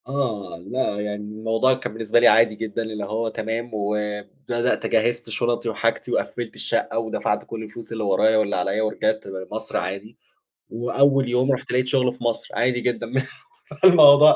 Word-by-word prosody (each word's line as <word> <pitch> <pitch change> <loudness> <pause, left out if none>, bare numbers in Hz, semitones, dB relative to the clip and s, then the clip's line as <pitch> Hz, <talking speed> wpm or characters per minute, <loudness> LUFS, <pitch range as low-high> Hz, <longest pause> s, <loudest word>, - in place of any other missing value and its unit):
آه. 115 -10 -3
لأ، 115 -3 -1
يعني 105 0 -4 0.2
الموضوع 115 +4 +2
كان 130 - -5
بالنسبة 115 +1 +2
لي 120 - +6
عادي 115 -1 +5
جدًا، 110 +1 -4
اللي 110 -2 -5
هو 110 +3 -2
تمام 110 +2 -4
وبدأت 105 +4 -2
جهّزت 120 +1 0
شُنَطي 120 +1 -1
وحاجتي 110 - -1
وقفِّلت - - -3
الشقّة - - -2
ودفعت 110 -2 -2
كل 115 -1 -7
الفلوس 110 +1 -10
اللي 110 -1 -3
ورايا 105 +2 +3
واللي 105 -1 +1
عليّا، 95 +4 0
ورجعت 110 0 -1
لمصر 95 +3 -5
عادي 100 +4 -5 0.5
وأول 135 +3 +2
يوم 125 +2 +2
رُحت 130 - -3
لقيت 125 0 +2
شغل 130 -1 +2
في 125 - -10
مصر، 115 -1 -1
عادي 125 +1 +1
جدًا 120 -1 -2
مه 130 +3 -1 0.6
فالموضوع 155 -5 +8
115 Hz, 165 wpm, -23 LUFS, 105-125 Hz, 0.6 s, فالموضوع